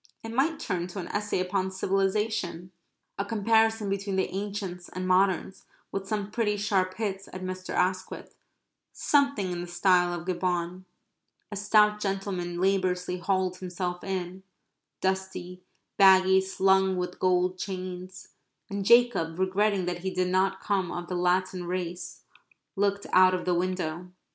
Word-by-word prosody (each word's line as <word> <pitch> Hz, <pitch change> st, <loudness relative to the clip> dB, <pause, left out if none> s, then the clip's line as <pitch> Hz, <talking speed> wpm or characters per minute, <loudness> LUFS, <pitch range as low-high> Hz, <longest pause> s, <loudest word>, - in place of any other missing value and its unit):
It 225 Hz, -, -6 dB
might 285 Hz, +7 st, +1 dB
turn 180 Hz, -3 st, -2 dB
to 185 Hz, +2 st, -7 dB
an 175 Hz, -, -6 dB
essay 205 Hz, -2 st, -1 dB
upon 185 Hz, +1 st, 0 dB
civilization. 195 Hz, -1 st, -1 dB, 0.5 s
A -, -, +1 dB
comparison 220 Hz, +1 st, +2 dB
between 195 Hz, 0 st, -2 dB
the 190 Hz, -, -1 dB
ancients 195 Hz, -3 st, -4 dB
and 185 Hz, 0 st, -4 dB
moderns, 190 Hz, 0 st, +1 dB, 0.3 s
with 195 Hz, 0 st, -4 dB
some 210 Hz, -1 st, -2 dB
pretty 210 Hz, -2 st, 0 dB
sharp 190 Hz, -2 st, 0 dB
hits 195 Hz, -3 st, -3 dB
at 185 Hz, 0 st, -7 dB
Mr. 185 Hz, 0 st, -5 dB
Asquith 185 Hz, +1 st, -1 dB, 0.6 s
something 280 Hz, -10 st, +1 dB
in 175 Hz, -1 st, -3 dB
the 175 Hz, -, -6 dB
style 175 Hz, 0 st, +3 dB
of 170 Hz, -, -11 dB
Gibbon. 180 Hz, 0 st, -2 dB, 0.7 s
A -, -, -4 dB
stout 210 Hz, +1 st, +4 dB
gentleman 195 Hz, -3 st, -3 dB
laboriously 185 Hz, -1 st, 0 dB
hauled 185 Hz, 0 st, 0 dB
himself 180 Hz, -1 st, -4 dB
in, 185 Hz, -1 st, -4 dB, 0.6 s
dusty, 190 Hz, -1 st, -3 dB, 0.4 s
baggy, 190 Hz, -1 st, +6 dB
slung 190 Hz, 0 st, +2 dB
with 180 Hz, 0 st, -4 dB
gold 185 Hz, 0 st, +2 dB
chains, 185 Hz, -1 st, -6 dB, 0.4 s
and 200 Hz, 0 st, -2 dB
Jacob, 220 Hz, -8 st, +4 dB
regretting 190 Hz, +1 st, +1 dB
that 175 Hz, 0 st, -3 dB
he 190 Hz, +2 st, -3 dB
did 185 Hz, 0 st, 0 dB
not 190 Hz, +1 st, +1 dB
come 190 Hz, -4 st, 0 dB
of 175 Hz, 0 st, -5 dB
the 180 Hz, -, -2 dB
Latin 180 Hz, 0 st, 0 dB
race, 175 Hz, 0 st, -5 dB, 0.5 s
looked 200 Hz, 0 st, 0 dB
out 185 Hz, 0 st, +6 dB
of 180 Hz, -, -4 dB
the 180 Hz, -, +2 dB
window. 180 Hz, -1 st, -2 dB
185 Hz, 145 wpm, -27 LUFS, 180-200 Hz, 0.7 s, baggy